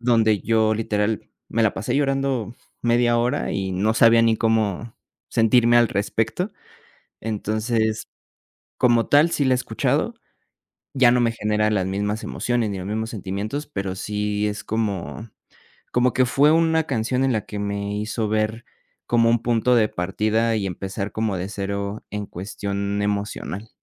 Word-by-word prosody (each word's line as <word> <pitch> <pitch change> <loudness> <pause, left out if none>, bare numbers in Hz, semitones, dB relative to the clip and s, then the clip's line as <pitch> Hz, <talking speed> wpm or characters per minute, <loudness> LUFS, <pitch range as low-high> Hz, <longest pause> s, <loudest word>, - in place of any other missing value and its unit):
donde 115 -4 +3
yo 110 -1 +2
literal 105 -1 -1 0.2
me 115 - 0
la 110 - +2
pasé 110 +6 -2
llorando 135 -5 0 0.3
media 120 0 +3
hora, 125 +5 0
y 95 -1 -2
no 105 +4 +1
sabía 115 0 +6
ni 115 -1 +3
cómo 110 -1 0 0.4
sentirme 120 +1 +4
al 120 -1 +5
respecto. 110 - -1 0.7
Entonces, 110 +1 -1 0.7
como 120 -2 +3
tal, 150 +4 +5
sí 145 - 0
la 130 -1 +3
he - - +2
escuchado, 125 - -1 0.8
ya 130 -3 +5
no 125 +1 +3
me 115 -1 +2
genera 105 -1 0
las 95 -3 0
mismas 105 +3 -2
emociones 120 -3 -1
ni 100 - -4
los 95 - -6
mismos 110 +2 -3
sentimientos, 105 +7 -4
pero 95 -8 -4
sí 105 +1 -2
es 105 0 -3
como 110 0 -3 0.6
como 125 0 +3
que 130 - +2
fue 145 +4 +4
una 160 0 +3
canción 125 -1 0
en 135 - +2
la 110 -3 -2
que 105 - -6
me 100 0 -3
hizo 105 +1 -2
ver 110 +2 -1 0.4
como 115 -1 +3
un 115 -1 +2
punto 120 +1 +2
de 110 -2 +4
partida, 110 +6 0
y 100 - -1
empezar 95 +2 -4
como 110 -3 -1
de 90 +2 -4
cero 100 +1 -4
en 105 -1 -4
cuestión 100 +2 -4
emocional. 100 0 -3
110 Hz, 160 wpm, -23 LUFS, 105-120 Hz, 0.8 s, sabía